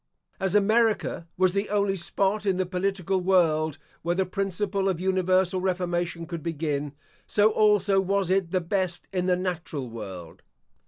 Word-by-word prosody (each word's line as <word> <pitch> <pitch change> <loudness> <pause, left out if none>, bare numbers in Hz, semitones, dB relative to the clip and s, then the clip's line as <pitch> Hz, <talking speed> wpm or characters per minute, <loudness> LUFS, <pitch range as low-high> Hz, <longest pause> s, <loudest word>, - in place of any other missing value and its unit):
As 190 +1 0
America 215 -4 +2
was 185 -1 +3
the 200 +1 -1
only 200 -1 +1
spot 195 +3 -1
in 190 -2 +2
the 185 - 0
political 190 0 -1
world 160 -5 +2 0.2
where 170 +1 0
the 190 +1 +1
principle 195 +1 -1
of 180 -3 -1
universal 185 0 +1
reformation 175 -2 -1
could 165 0 -6
begin, 150 -3 -2 0.3
so 210 +1 +4
also 205 -2 +3
was 195 -1 0
it 190 -2 +1
the 185 +1 0
best 180 0 -2
in 180 -1 0
the 180 -1 +3
natural 170 -8 -4
world. 95 -7 -8
185 Hz, 155 wpm, -26 LUFS, 170-195 Hz, 0.3 s, so